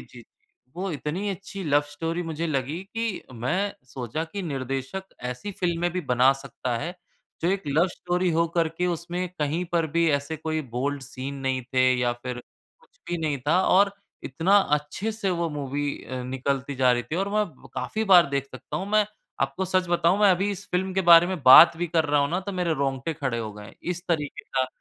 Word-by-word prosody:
जी। -, -, -13 dB, 0.5 s
वो 190 Hz, +1 st, -2 dB
इतनी 160 Hz, +8 st, -3 dB
अच्छी 195 Hz, +1 st, -7 dB
लव 145 Hz, -1 st, +4 dB
स्टोरी 165 Hz, +4 st, -3 dB
मुझे 165 Hz, 0 st, -3 dB
लगी 150 Hz, +3 st, -2 dB
कि 225 Hz, -3 st, -2 dB
मैं 180 Hz, -, -1 dB
सोचा 130 Hz, +4 st, -4 dB
कि 195 Hz, +4 st, -6 dB
निर्देशक 135 Hz, +4 st, -4 dB, 0.3 s
ऐसी 125 Hz, +11 st, -6 dB
फ़िल्में 175 Hz, -1 st, 0 dB
भी 180 Hz, -, -1 dB
बना 130 Hz, -3 st, +4 dB
सकता 130 Hz, -3 st, -4 dB
है, 170 Hz, +4 st, -4 dB, 0.5 s
जो 170 Hz, -, +2 dB
एक 195 Hz, +1 st, 0 dB
लव 155 Hz, +5 st, +3 dB
स्टोरी 180 Hz, 0 st, -1 dB
हो 165 Hz, +1 st, +2 dB
कर 165 Hz, -1 st, +3 dB
के 180 Hz, -, +1 dB
उसमें 175 Hz, +1 st, -2 dB
कहीं 155 Hz, +4 st, 0 dB
पर 165 Hz, -2 st, +2 dB
भी 170 Hz, 0 st, +4 dB
ऐसे 145 Hz, +2 st, -1 dB
कोई 155 Hz, 0 st, -2 dB
बोल्ड 140 Hz, +3 st, -1 dB
सीन 135 Hz, +1 st, -6 dB
नहीं 130 Hz, -1 st, 0 dB
थे 130 Hz, 0 st, +5 dB
या 120 Hz, -1 st, +1 dB
फिर 120 Hz, 0 st, -6 dB, 0.4 s
कुछ -, -, -28 dB
भी 175 Hz, -, -1 dB
नहीं 155 Hz, -3 st, -1 dB
था 175 Hz, +4 st, +4 dB
और 200 Hz, +1 st, +5 dB, 0.3 s
इतना 165 Hz, +9 st, +2 dB, 0.2 s
अच्छे 190 Hz, +9 st, -5 dB
से 210 Hz, -3 st, -2 dB
वो 170 Hz, -2 st, 0 dB
मूवी 145 Hz, 0 st, -2 dB
अ, 130 Hz, -1 st, -5 dB
निकलती 135 Hz, +2 st, -2 dB
जा 125 Hz, -1 st, +4 dB
रही 120 Hz, 0 st, 0 dB
थी 135 Hz, +8 st, -5 dB
और 195 Hz, +2 st, 0 dB
मैं 210 Hz, 0 st, +2 dB, 0.3 s
काफ़ी 220 Hz, 0 st, -2 dB
बार 175 Hz, -1 st, +8 dB
देख 140 Hz, -1 st, -1 dB
सकता 130 Hz, -, -7 dB
हूँ। 190 Hz, -, -3 dB
मैं 215 Hz, -1 st, +4 dB, 0.4 s
आपको 135 Hz, +8 st, -1 dB
सच 185 Hz, 0 st, +1 dB
बताऊँ 175 Hz, +2 st, +3 dB
मैं 205 Hz, -, +6 dB
अभी 190 Hz, +3 st, +2 dB
इस 200 Hz, 0 st, -6 dB
फ़िल्म 190 Hz, +1 st, 0 dB
के 190 Hz, -, +2 dB
बारे 170 Hz, +1 st, +9 dB
में 185 Hz, -4 st, -4 dB
बात 135 Hz, +6 st, +10 dB
भी 175 Hz, +1 st, -1 dB
कर 165 Hz, -1 st, +1 dB
रहा 145 Hz, -1 st, +2 dB
हूँ 140 Hz, +2 st, +1 dB
ना 180 Hz, +2 st, 0 dB
तो 200 Hz, +1 st, -6 dB
मेरे 175 Hz, -3 st, 0 dB
रोंगटे 135 Hz, +2 st, -1 dB
खड़े 135 Hz, -6 st, -2 dB
हो 110 Hz, -2 st, -4 dB
गए, 105 Hz, 0 st, -11 dB
इस 175 Hz, 0 st, -3 dB
तरीके 150 Hz, -4 st, -2 dB
का 130 Hz, -1 st, 0 dB
160 Hz, 210 wpm, -25 LUFS, 135-180 Hz, 0.5 s, बात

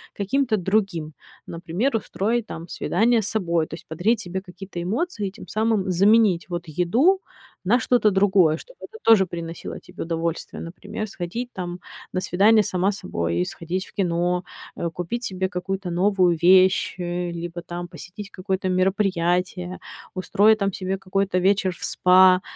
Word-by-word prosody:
каким-то 220 Hz, +3 st, +1 dB
другим. 190 Hz, -5 st, -1 dB, 0.3 s
Например, 175 Hz, +10 st, -2 dB
устроить, 225 Hz, +2 st, -1 dB
там, 165 Hz, -5 st, -8 dB
свидание 225 Hz, +6 st, +1 dB
с -, -, -3 dB
собой, 170 Hz, -7 st, 0 dB
то -, -, -12 dB
есть 165 Hz, -, -9 dB
подарить 200 Hz, +9 st, +1 dB
себе 185 Hz, -1 st, -4 dB
какие-то 185 Hz, 0 st, -9 dB
эмоции 210 Hz, -, -2 dB
и -, -, -14 dB
тем 200 Hz, -, -12 dB
самым 215 Hz, -3 st, 0 dB
заменить, 195 Hz, -1 st, +4 dB
вот, 175 Hz, -1 st, -4 dB
еду 235 Hz, -, +2 dB, 0.4 s
на 220 Hz, +7 st, +3 dB
что-то 225 Hz, -2 st, +3 dB
другое, 190 Hz, -5 st, +4 dB
чтобы -, -, -14 dB
это 445 Hz, -, -10 dB
тоже 220 Hz, -4 st, +6 dB
приносило 170 Hz, -1 st, -6 dB
тебе -, -, -8 dB
удовольствие. 165 Hz, 0 st, -3 dB
Например, 200 Hz, +5 st, -6 dB
сходить, 205 Hz, +6 st, -5 dB
там, 180 Hz, -3 st, -5 dB, 0.3 s
на 185 Hz, -, 0 dB
свидание 210 Hz, +5 st, +4 dB
сама 185 Hz, +1 st, +1 dB
с 200 Hz, -, -7 dB
собой, 85 Hz, +1 st, -1 dB
сходить 175 Hz, -, -4 dB
в -, -, -18 dB
кино, 175 Hz, -1 st, 0 dB, 0.3 s
э, 170 Hz, -, -2 dB
купить 180 Hz, +9 st, -4 dB
себе 190 Hz, -2 st, -2 dB
какую-то 195 Hz, 0 st, -4 dB
новую 180 Hz, -1 st, +2 dB
вещь, 185 Hz, +2 st, +5 dB
э, 175 Hz, 0 st, -2 dB
либо 170 Hz, 0 st, -6 dB
там 175 Hz, 0 st, -6 dB
посетить 190 Hz, +3 st, -10 dB
какое-то 190 Hz, -1 st, -2 dB
мероприятие, 185 Hz, -1 st, 0 dB, 0.3 s
устроить 205 Hz, +3 st, +3 dB
там 200 Hz, -1 st, +1 dB
себе 190 Hz, 0 st, -3 dB
какой-то 195 Hz, -1 st, 0 dB
вечер 190 Hz, -1 st, +2 dB
в -, -, -11 dB
спа. 185 Hz, 0 st, +5 dB
185 Hz, 155 wpm, -23 LUFS, 175-205 Hz, 0.4 s, тоже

